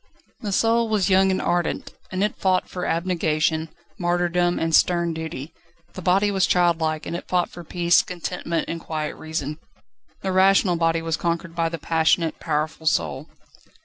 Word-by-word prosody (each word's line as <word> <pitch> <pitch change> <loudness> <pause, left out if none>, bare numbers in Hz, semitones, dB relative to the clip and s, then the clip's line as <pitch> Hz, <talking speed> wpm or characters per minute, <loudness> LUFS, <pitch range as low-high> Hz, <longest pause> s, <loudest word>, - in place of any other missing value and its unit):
The 210 -4 -4
soul 230 +3 +2
was 200 -4 +1
young 190 +1 +5
and 190 - +1
ardent, 175 -1 -1 0.2
and 185 +1 -1
it 210 - 0
fought 185 -1 +1
for 180 -1 -4
abnegation, 160 -2 0 0.3
martyrdom, 175 0 +1
and 165 0 -1
stern 170 0 +3
duty; 160 -2 -6 0.4
the 185 - -7
body 195 +4 +3
was 190 -2 +2
childlike, 165 -3 +1
and - - -4
it - - -6
fought 180 -1 0
for 175 - -9
peace, 170 +1 +3
contentment, 175 -1 -3
and 165 - -4
quiet 155 -2 -4
reason. 155 -1 -4 0.6
The 190 - -2
rational 190 0 +4
body 165 -1 +1
was 165 -1 -1
conquered 170 0 -2
by 165 -1 +1
the 165 - -4
passionate, 160 +1 +1
powerful 155 0 -2
soul. 145 -1 0
170 Hz, 165 wpm, -23 LUFS, 160-185 Hz, 0.6 s, young